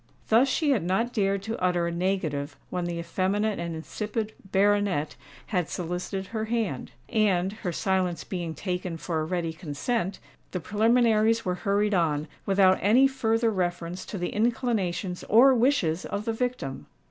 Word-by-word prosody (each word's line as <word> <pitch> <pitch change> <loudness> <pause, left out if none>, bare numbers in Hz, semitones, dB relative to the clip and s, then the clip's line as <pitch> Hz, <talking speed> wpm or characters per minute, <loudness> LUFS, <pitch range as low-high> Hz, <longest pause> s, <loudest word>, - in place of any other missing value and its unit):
Thus 230 +5 +5
she 290 +2 +1
had 255 - +2
not 225 +8 0
dared 195 -2 +1
to 225 +1 -4
utter 180 -1 +2
a 170 - -1
negative 165 -6 -2
when 180 -1 -2
the 175 -1 -3
effeminate 190 +5 0
and 170 -1 -3
insipid 210 +6 -4 0.2
baronet 200 -6 +2 0.3
had 180 -5 -1
solicited 180 +2 -3
her 220 -1 -2
hand; 220 - -2 0.2
and, 195 -3 +2
her 205 -5 -4
silence 185 -1 0
being 170 -4 -4
taken 180 0 -3
for 160 -1 -2
a - - -2
ready 170 -1 -2
consent, 180 - -2 0.4
the 180 - -1
preliminaries 225 +3 +3
were 180 - +1
hurried 205 +2 +1
on, 155 -4 +1 0.2
without 195 -1 +4
any 240 +7 +5
further 225 -3 +1
reference 175 -2 -2
to 205 - -5
the 175 -1 -2
inclinations 210 -6 -1
or 255 +5 +6
wishes 230 - +2
of 200 +1 -4
the 225 - 0
victim! 230 - -3
190 Hz, 160 wpm, -27 LUFS, 175-220 Hz, 0.4 s, or